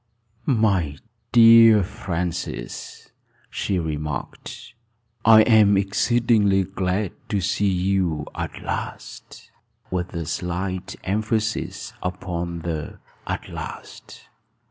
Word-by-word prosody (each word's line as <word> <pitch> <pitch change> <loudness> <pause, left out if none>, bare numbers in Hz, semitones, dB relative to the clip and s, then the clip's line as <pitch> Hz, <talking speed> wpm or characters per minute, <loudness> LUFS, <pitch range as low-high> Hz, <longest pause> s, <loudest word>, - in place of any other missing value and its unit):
"My 100 - +1 0.3
dear 115 -2 +8
Francis," 85 -9 -5 0.4
she 95 - -1
remarked, 75 -4 -5 0.5
"I 110 0 +8
am 105 -4 +5
exceedingly 100 0 +2
glad 95 +1 -2 0.2
to 100 - 0
see 100 +2 +1
you 90 -4 0
at - - -6
last," - - -7 0.4
with 90 -1 -3
a 85 -1 -3
slight 90 +3 -3
emphasis 110 +2 -2
upon 85 -2 -4
the 80 -3 -4 0.3
"at - - -4
last." - - -9
95 Hz, 90 wpm, -23 LUFS, 85-105 Hz, 0.5 s, dear